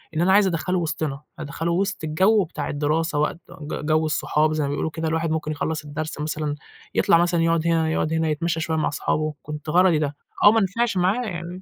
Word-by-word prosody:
إن 160 - +1
أنا 190 +2 +4
عايز 200 0 +5
أدخّله 180 +1 -1
وسطنا 155 -4 -3 0.2
أدخّله 160 +2 -3
وسط 195 +1 -1
الجو 190 +7 +3
بتاع 155 -3 -5
الدراسة، 150 +1 0
وقت 150 +2 0 0.2
ج 150 0 -5
جو 155 +1 +2
الصحاب 155 0 +1
زي 155 -1 0
ما 140 - -1
بيقولوا 145 +3 -1
كده، 160 +1 -3
الواحد 160 0 0
ممكن 160 -1 -2
يخلّص 155 +1 -3
الدرس 150 +1 -5
مثلًا 150 -1 -2 0.4
يطلع - - +5
مثلًا 175 -1 +2
يقعد 165 0 +1
هنا، 165 -1 +2
يقعد 160 0 0
هنا 160 0 +1
يتمشى 165 +2 -1
شويّة 160 0 -1
مع 155 - +1
صحابه، 155 +1 -1
كنت 150 0 -7
غرضي 175 -1 +4
ده، 145 -1 -2 0.3
آه 205 - +9
ما 225 0 +3
نفعش 215 +2 0
معاه 190 +7 +2
يعني. 175 -2 -6
160 Hz, 210 wpm, -23 LUFS, 155-175 Hz, 0.4 s, آه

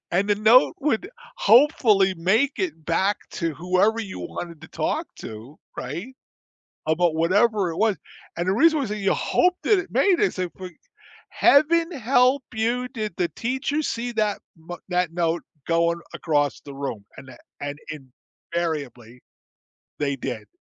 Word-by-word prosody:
And 195 +4 +1
the 205 - +4
note 220 +8 +5
would 295 - -1 0.3
hopefully 215 -5 +4
make 200 +11 +2
it 165 -5 -3
back 190 +5 +1
to 165 -2 -2
whoever 185 +7 +1
you 195 -4 -7
wanted 170 -3 -7
to - - -11
talk - - -2
to, 115 +7 -10 0.2
right? 170 - -6 0.7
About 160 +1 +2
whatever 200 +4 +2
it 165 - -7
was, 215 0 +2 0.4
and 175 +1 -2
the 190 - +3
reason 315 +7 +4
was 265 -7 -2
that 210 - -3
you 195 -2 +1
hope 360 0 +2
that 420 - +4
it 380 - -7
made 380 -3 +3
it, 415 - +2
so 185 -2 -3
for 185 -1 -7 0.6
heaven 330 +4 +4
help 260 +1 +3
you 235 +3 -1
did 215 -5 -4
the 175 -2 0
teacher 265 +5 -2
see 245 -4 -3
that 215 -3 0 0.2
ma 165 +2 -8
that 180 -2 0
note 170 -1 0 0.2
going 170 0 +1
across 145 -3 0
the 140 - -10
room 135 -7 -5
and 130 0 -11
a 125 - -12 0.2
and 145 0 -5 0.7
invariably 140 -8 -4 0.8
they 140 -2 0
did, 120 -5 -5
190 Hz, 155 wpm, -24 LUFS, 165-240 Hz, 0.8 s, note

